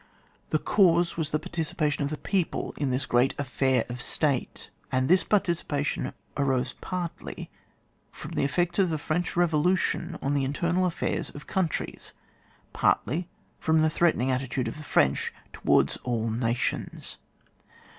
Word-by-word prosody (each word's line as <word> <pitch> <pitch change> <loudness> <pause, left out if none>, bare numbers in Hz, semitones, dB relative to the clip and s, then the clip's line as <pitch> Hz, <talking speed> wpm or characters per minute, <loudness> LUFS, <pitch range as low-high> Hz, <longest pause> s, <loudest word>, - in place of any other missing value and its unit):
The 155 - +3
cause 175 -1 +3
was 160 -3 -1
the 155 - +1
participation 155 -2 -2
of 140 - -1
the 155 - -3
people 190 -1 -1
in 140 -2 -1
this 130 +2 0
great 125 +2 +2
affair 130 -2 +1
of 120 0 -6
State, 140 -5 -1 0.2
and 130 0 +2
this 185 +2 +5
participation 170 -7 0 0.2
arose 135 -3 +1
partiy 180 -2 -5 0.6
from - - -9
the - - 0
effects 175 +6 +1
of 190 -2 +4
the 160 - 0
French 155 +4 -2
Bevolution 175 +1 +1
on 140 - -1
the 140 -1 +1
internal 170 +7 +1
affairs 170 - -2
of 145 - -10
coimtries, 185 -4 -2 0.6
partly 170 - +1 0.3
from 160 0 +3
the 155 - +3
threatening 155 -6 +2
attitude 130 -1 -1
of 115 - -5
the 155 - -8
French 70 - +2 0.2
towards - - +3
all 115 -2 -1
nations. 115 +1 -1
150 Hz, 145 wpm, -27 LUFS, 130-175 Hz, 0.6 s, this